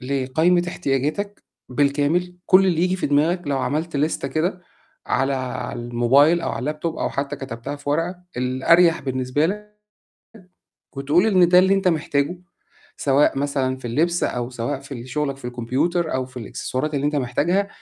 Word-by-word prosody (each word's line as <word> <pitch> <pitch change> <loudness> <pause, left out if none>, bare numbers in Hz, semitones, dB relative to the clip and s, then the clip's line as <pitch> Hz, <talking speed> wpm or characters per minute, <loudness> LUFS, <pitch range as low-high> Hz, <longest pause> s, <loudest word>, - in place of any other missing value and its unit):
لقايمة 140 +7 +1
احتياجاتك 165 +6 -2 0.3
بالكامل، 145 +7 +1
كل 190 +1 +6
اللي 170 -3 +1
ييجي 180 +1 +1
في - - -1
دماغك 155 +5 +2
لو 140 -1 0
عملت 155 +4 -2
ليستة 145 -1 -1
كده 170 +6 -1 0.5
على 135 +2 +1
على 125 -1 -4
الموبايل 125 +8 +3
أو - - -2
على - - -4
اللاب 150 +5 -3
توب 165 -1 -2
أو - - -1
حتّى 140 0 -3
كتبتها 135 +2 -6
في 145 0 -5
ورقة، 165 +5 0 0.2
الأريح 135 +7 +3
بالنسبة 130 +3 0
لك 210 +3 -6 1.2
وتقول 145 +8 +2
إن 185 -5 +5
ده 180 0 +7
اللي 190 +1 +4
أنت 195 -1 +1
محتاجه، 155 -1 0 0.6
سواء 140 0 +2
مثلًا 135 -2 -1
في 130 - -17
اللبس 170 +8 +1
أو 120 0 -2
سواء 125 +3 -3
في 140 0 -9
ال 120 0 -8
شُغلك 140 0 -2
في 135 - -17
الكمبيوتر 130 +8 -1
أو 130 0 0
في 130 0 -20
الإكسسوارات 130 +5 -4
اللي 140 0 0
أنت 150 0 0
محتاجها 160 +10 0
145 Hz, 170 wpm, -22 LUFS, 130-170 Hz, 1.2 s, ده